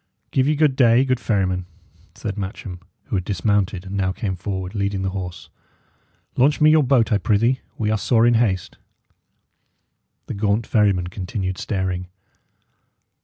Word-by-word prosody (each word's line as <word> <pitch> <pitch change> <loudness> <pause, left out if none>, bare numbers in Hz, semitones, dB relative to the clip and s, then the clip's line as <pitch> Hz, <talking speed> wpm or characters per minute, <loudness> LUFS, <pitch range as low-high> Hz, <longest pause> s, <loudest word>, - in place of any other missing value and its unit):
"Give 130 0 +2
ye 150 - +2
good 150 -3 +3
day, 125 0 +5
good 130 -2 0
ferryman," 95 -5 0 0.5
said 100 - -5
Matcham, 95 -2 -6 0.2
who - - -4
had 95 - 0
dismounted, 100 -1 0
and 95 +1 -6
now 95 -1 +1
came 95 0 -3
forward, 95 0 -4
leading 100 -2 -1
the 95 - -1
horse. 90 -2 -6 0.9
"Launch 145 +4 +3
me 155 0 +6
your 155 0 +5
boat, 130 -4 +2
I 105 - +3
prithee; 115 +6 +2 0.2
we 105 -1 0
are 110 - +1
sore 115 0 +3
in 120 - +5
haste." 105 -6 0 1.5
The - - -5
gaunt 105 +2 0
ferryman 100 -5 +2
continued 95 +1 -4
staring. 95 -3 -2
100 Hz, 155 wpm, -22 LUFS, 95-115 Hz, 1.5 s, me